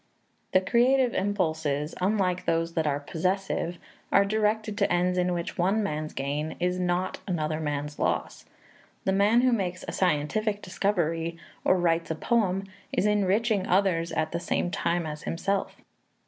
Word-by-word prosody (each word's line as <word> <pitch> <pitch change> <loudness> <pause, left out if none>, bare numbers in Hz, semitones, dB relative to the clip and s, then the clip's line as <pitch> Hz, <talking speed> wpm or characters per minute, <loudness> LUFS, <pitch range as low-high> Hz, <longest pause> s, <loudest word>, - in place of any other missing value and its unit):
The 185 - +5
creative 245 +5 +3
impulses, 160 -7 -1
unlike 185 -2 +1
those 165 0 0
that 160 -2 0
are 145 -1 +1
possessive, 175 +3 -2 0.3
are 200 - +5
directed 215 +1 0
to 200 - +2
ends 180 +1 +2
in 180 0 +1
which 175 0 -3
one 195 +5 +2
man's 155 -4 -3
gain 145 +3 -2
is 180 +1 0
not 180 +1 -1
another 155 -4 -1
man's 150 -1 -3
loss. - - -1 0.6
The 190 - +2
man 205 +5 +4
who 255 0 +3
makes 185 -5 -1
a - - -3
scientific 200 +5 0
discovery 170 -4 -1 0.3
or 185 - +4
writes 170 -1 +1
a 160 - -1
poem 195 0 +1 0.3
is - - +1
enriching 210 0 +2
others 180 -3 +2
at 155 0 0
the 170 - -2
same 175 0 -1
time 170 -1 0
as 150 -1 -5
himself. 195 +4 -2
180 Hz, 155 wpm, -27 LUFS, 165-200 Hz, 0.6 s, The